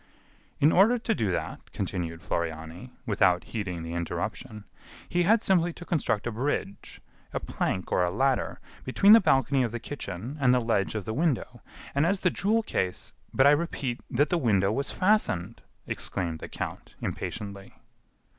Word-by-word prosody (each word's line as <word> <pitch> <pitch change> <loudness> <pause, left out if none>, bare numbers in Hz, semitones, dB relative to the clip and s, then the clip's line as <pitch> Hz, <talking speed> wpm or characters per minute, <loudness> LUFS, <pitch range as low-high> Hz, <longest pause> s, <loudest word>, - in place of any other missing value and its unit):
"In 150 +3 +5
order 220 +7 +5
to 230 -1 0
do 105 - 0
that," 85 - -4
continued 85 -4 -4
Floriani, 80 +8 -4
without 90 -5 +3
heeding 95 -7 -4
the 85 0 -5
interruption, 85 +5 -4 0.4
"he 175 - +1
had 215 +6 +4
simply 175 -2 +3
to 175 - -10
construct 140 -11 0
a 120 - -1
bridge, 115 -4 -3 0.3
a - - -1
plank 95 -1 -3
or 90 - +3
a 90 - +1
ladder, 130 +4 0 0.2
between 195 +10 +4
the 225 - +11
balcony 135 -5 +3
of 120 - +1
the 120 - -4
kitchen 125 - -6
and 125 -2 +4
the - - +3
ledge 115 -4 0
of 105 -4 -3
the 110 - -3
window, 130 -5 -1 0.3
and 140 +4 +2
as 195 +1 0
the 180 - +3
jewel 215 +6 +1
case 95 - -2
" - - -35
"But 135 - +3
I 140 - +8
repeat 145 -5 -1
that 145 +5 +2
the 175 - +1
window 100 - +2
was 140 +5 -1
fastened," 115 - +1 0.2
exclaimed 85 -4 -3
the - - -8
count, - - -6
impatiently. 100 -1 -5
120 Hz, 175 wpm, -27 LUFS, 95-160 Hz, 0.4 s, the